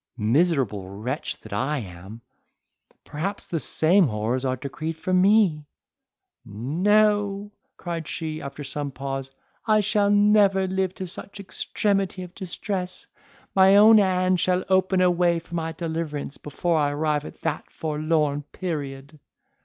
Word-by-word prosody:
Miserable 120 - +1
wretch 115 +9 -4
that - - -10
I 150 +3 0
am! 95 0 -9 0.8
perhaps 190 +7 -4
the 165 - -2
same 170 +4 +4
horrors 115 +3 -2
are 130 -1 0
decreed 155 +5 -5
for 185 +3 -3
me!" 185 -5 +3 0.8
"No!" 205 - +1 0.3
cried 170 -3 -5
she, 155 -1 -4
after 140 +1 -7
some 145 +1 -4
pause, 135 0 -5 0.4
"I 215 -1 +4
shall 205 0 +1
never 205 -2 +4
live 190 0 -1
to 190 - -5
such 200 +2 -6
extremity 195 -1 -2
of 180 -1 -11
distress; 185 0 -4 0.5
my 190 0 +6
own 215 +2 +8
hand 185 -2 +2
shall 185 +1 +1
open 190 0 +3
a 180 -1 +5
way 175 -1 +2
for 170 +1 -10
my 165 -1 -2
deliverance, 160 -4 -4
before 160 +3 -1
I 145 -1 +2
arrive 150 0 0
at - - -11
that 160 -2 -3
forlorn 155 -2 -1
period!" 145 -4 -5
165 Hz, 135 wpm, -24 LUFS, 145-190 Hz, 0.8 s, own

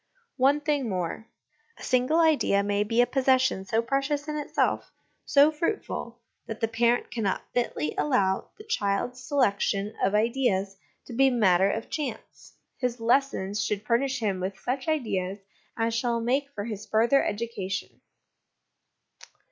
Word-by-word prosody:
One 280 +3 +3
thing 290 -5 0
more: 185 +4 -3 0.5
a - - -12
single 255 +6 +2
idea 300 -11 +3
may 205 0 +1
be 230 +3 +2
a - - +5
possession 260 -7 +2
so 225 +4 0
precious 275 +4 -1
in 300 - -3
itself, 295 -1 -1 0.3
so 290 +1 +5
fruitful, 310 - -3 0.3
that 225 - -6
the 225 - +1
parent 235 +2 +1
cannot 215 -5 -1
fitly 195 -11 -1
allow 190 +6 +1
the 425 - -11
child's 245 - -1
selection 210 -6 0
of 195 +2 +2
ideas 210 -4 +1 0.3
to 245 - -9
be 270 +3 +4
a - - +3
matter 195 -5 +4
of 225 +2 -4
chance: 300 -3 -6 0.2
his 250 -2 -2
lessons 225 -5 +1
should 205 +1 -2
furnish 260 +4 +1
him 200 -4 0
with 190 +1 -4
such 260 +6 -3
ideas 200 -11 -1 0.4
as 225 0 0
shall 235 0 0
make 265 +5 0
for 205 - -4
his 215 -2 -6
further 230 +6 +3
education. 205 -3 -4
235 Hz, 150 wpm, -27 LUFS, 200-270 Hz, 0.5 s, a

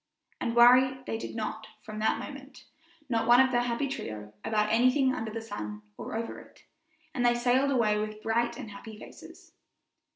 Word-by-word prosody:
And 230 -2 -2
worry 255 +2 +6
they 225 - -3
did - - -7
not 220 0 -4 0.2
from 215 0 -7
that 220 - +1
moment, - - -10 0.4
not 230 -3 0
one 240 +1 +7
of 260 0 +5
the 240 -1 +2
happy 245 +3 -1
trio, 105 - -6
about 210 -1 +1
anything 255 +3 +3
under 225 -2 -4
the 225 +1 -5
sun, 105 - -6
or - - -7
over 230 +1 -4
it, - - -18 0.5
and 245 - -1
they 240 0 +4
sailed 250 +3 +2
away 220 -6 +2
with 215 0 -5
bright 235 +2 0
and 210 - -8
happy 215 +2 -10
faces. - - -14
230 Hz, 185 wpm, -29 LUFS, 215-245 Hz, 0.5 s, one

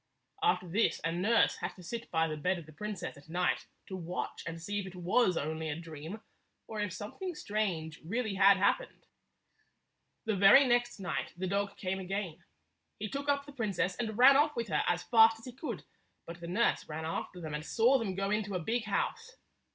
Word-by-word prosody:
After 415 - +2
this 200 +7 +1
a 165 - 0
nurse 200 +7 +3
had - - -4
to 180 - -13
sit 235 +6 -6
by 160 -1 +2
the 155 - -3
bed 180 +5 0
of 170 - -9
the 155 - -13
princess 200 -3 -5
at 140 +3 -16
night 180 +2 0 0.2
to 190 - -6
watch 175 -1 -4
and 165 0 -5
see 205 +5 -3
if 195 - -5
it 185 - -10
was 180 +1 +2
only 160 +2 -2
169 150 0 -3
a - - -7
dream, 165 +6 -8 0.4
or 220 - -6
if 205 -2 -1
something 265 - -6
strange 185 - -2
really 220 +5 -2
had 195 0 +6
happened. 200 - 0 1.2
The 220 -2 +1
very 200 +9 +8
next 240 -2 +1
night 185 -3 -3
the 185 - -2
dog 200 +1 -1
came 190 0 -2
again. 185 -3 -4 0.5
He 210 0 -4
took 280 +4 -4
up 280 0 +2
the 285 - -10
princess 200 -8 -1
and 220 -3 -3
ran 265 +3 +8
off 295 +2 +3
with 235 -3 -3
her 150 -2 +2
as 175 0 +1
fast 225 -1 +6
as 225 - -14
he 250 - -6
could, 275 +5 -5 0.4
but 170 +1 -8
the 170 - -6
nurse 205 +2 +1
ran 160 +1 -4
after 165 +2 -4
them 155 -3 -6
and 150 0 -3
saw 240 +9 +3
them 200 -5 -2
go 195 +1 -1
into 210 -2 -1
a - - 0
big 225 +7 -1
house. 455 - -2
195 Hz, 215 wpm, -32 LUFS, 170-230 Hz, 1.2 s, very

